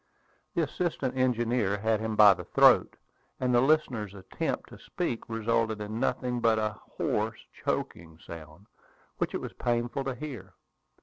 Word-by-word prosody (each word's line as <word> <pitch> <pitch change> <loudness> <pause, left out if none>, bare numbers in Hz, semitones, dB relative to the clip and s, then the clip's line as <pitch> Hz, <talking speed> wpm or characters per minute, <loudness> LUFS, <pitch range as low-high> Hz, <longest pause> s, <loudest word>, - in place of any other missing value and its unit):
The 170 - +2
assistant 150 -4 -2
engineer 120 -5 +1
had 110 +1 +1
him 110 0 -2
by 105 -2 +9
the 90 -1 -8
throat, - - +5 0.4
and 125 -1 +1
the 120 - +5
listener's 130 -8 +1
attempts 95 -1 -4
to - - -12
speak 115 - -4
resulted 115 -1 0
in 105 +2 -4
nothing 125 -1 0
but 115 -1 +3
a 110 -1 -2 0.2
hoarse, - - -1 0.2
choking 80 -1 -3
sound, 80 +3 -10 0.5
which - - -1
it - - -2
was - - -6
painful 120 +3 -1
to 135 -2 -2
hear. 125 -9 -8
115 Hz, 150 wpm, -29 LUFS, 105-125 Hz, 0.5 s, by